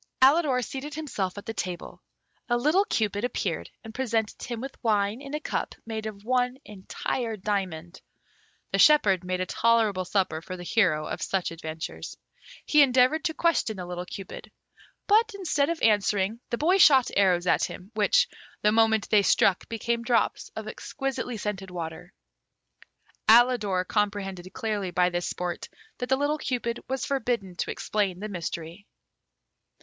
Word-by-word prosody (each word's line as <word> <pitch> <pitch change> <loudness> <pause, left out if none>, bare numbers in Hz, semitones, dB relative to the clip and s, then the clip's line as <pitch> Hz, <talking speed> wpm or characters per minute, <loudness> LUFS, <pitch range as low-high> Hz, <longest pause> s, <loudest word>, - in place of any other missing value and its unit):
Alidor 270 -2 +4
seated 285 +5 -6
himself 210 -12 -3
at 205 - -8
the 225 - -4
table. 180 -4 -5 0.5
A 240 - +3
little 310 +11 +3
Cupid 210 - -1
appeared 245 - -2
and 220 -1 -9
presented 230 -4 -1
him 240 -2 -5
with 265 +2 -8
wine 210 +1 +1
in 280 +1 -6
a - - -2
cup - - -3
made 220 -1 -4
of 205 -2 -8
one 250 +1 +1
entire 215 +3 -4
diamond. 185 -4 -3 0.7
The - - 0
shepherd 205 - +5
made 185 0 -2
a - - 0
tolerable 220 -2 +2
supper 180 -4 0
for 185 +2 -7
the 175 - -8
hero 175 -6 +2
of - - -5
such 190 -3 -1
adventures. 160 -1 -7 0.5
He 300 - +5
endeavoured 260 +4 +4
to 320 -2 0
question 330 - +1
the 180 - -5
little 180 0 -6
Cupid; 195 0 -8 0.6
but, 440 +1 +3
instead 315 -7 0
of 335 -1 -2
answering, 210 0 +2
the 235 - -1
boy 360 +8 +3
shot 270 -8 +6
arrows 185 -3 +3
at - - +3
him, 185 +4 -9
which, 355 - +3 0.4
the 210 - +5
moment 220 -1 +3
they 210 -2 +6
struck, 195 -1 +2
became 235 +1 -1
drops 235 0 0
of 220 0 -6
exquisitely 265 0 -4
scented 200 -2 -4
water. 170 0 -7 1.2
Alidor 220 -6 +5
comprehended 195 -3 -2
clearly 210 -3 -2
by 180 0 +2
this 175 0 -2
sport 180 -1 -4 0.3
that 250 - -4
the 265 - +3
little 290 +2 0
Cupid 240 -4 -2
was 265 0 -2
forbidden 240 -9 -2
to - - -2
explain 200 -4 -1
the 215 +2 -5
mystery. 170 0 -6
215 Hz, 160 wpm, -27 LUFS, 185-255 Hz, 1.2 s, shot